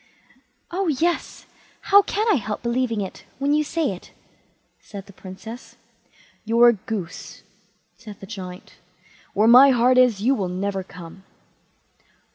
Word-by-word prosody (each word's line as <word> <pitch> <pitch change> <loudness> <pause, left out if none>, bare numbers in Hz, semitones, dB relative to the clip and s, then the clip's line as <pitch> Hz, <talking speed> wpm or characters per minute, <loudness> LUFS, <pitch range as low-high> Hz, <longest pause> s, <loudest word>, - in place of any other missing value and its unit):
"Oh 375 +2 -2
yes; 330 +3 -1 0.4
how 405 +1 +6
can 420 +2 -2
I 395 - +3
help 215 -2 -5
believing 235 -2 -1
it, 190 - -7
when 280 +2 0
you 305 0 +2
say 310 -2 -1
it", 185 - -10 0.7
said 200 -2 -10
the 200 - -16
Princess. 215 +7 -11 0.7
"You're 235 +2 +5
a - - +3
goose", 200 -4 -7 0.5
said 210 -3 -12
the - - -10
Giant; 185 -3 -10 0.6
"where 210 +3 +3
my 255 +4 +8
heart 255 0 +4
is, 245 -6 +4
you 245 +7 +2
will 195 -8 -2
never 195 +2 -3
come." 180 +1 -13
230 Hz, 140 wpm, -22 LUFS, 195-265 Hz, 0.7 s, my